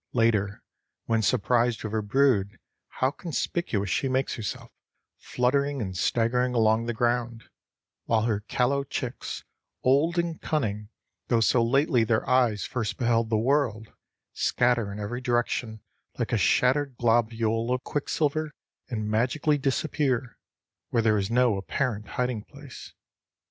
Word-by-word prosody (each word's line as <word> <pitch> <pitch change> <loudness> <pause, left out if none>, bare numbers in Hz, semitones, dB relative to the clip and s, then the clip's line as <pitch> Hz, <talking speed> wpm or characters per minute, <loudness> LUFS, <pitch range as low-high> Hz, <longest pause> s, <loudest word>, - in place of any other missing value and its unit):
Later, 110 -4 +1 0.4
when 115 -1 +1
surprised 120 +1 +1
with 110 -1 -5
her 110 - +1
brood, 105 -3 +2 0.3
how 130 +1 0
conspicuous 145 - -2
she 135 - 0
makes 130 +1 0
herself, 110 -3 -6 0.5
fluttering 140 +3 0
and 95 -5 -4
staggering 125 +5 +1
along 110 0 +3
the 120 - -1
ground, 120 0 -1 0.6
while 110 -1 +2
her 110 -3 0
callow 125 +6 0
chicks, 130 -2 -5 0.4
old 145 +7 +3
in 170 -2 -1
cunning 105 -9 -2 0.4
though 120 - +2
so 115 +1 +3
lately 130 0 +3
their 110 0 0
eyes 120 -5 +2
first 115 -4 -3
beheld 115 -2 +1
the 110 - +2
world, 115 -3 0 0.4
scatter 120 -4 +1
in 100 - -7
every 110 +5 -4
direction 120 -3 -1 0.4
like - - -2
a - - +4
shattered 135 +1 +2
globule 115 0 +1
of 125 +1 -1
quicksilver 150 +1 -1 0.4
and 110 -4 -3
magically 130 +7 +1
disappear 135 -3 -1 0.5
where 115 -2 +1
there 110 -2 +3
is 100 +1 -2
no 120 -3 +3
apparent 110 +1 -2
hiding 125 -4 -1
place. 140 +1 -12
120 Hz, 135 wpm, -26 LUFS, 110-130 Hz, 0.6 s, a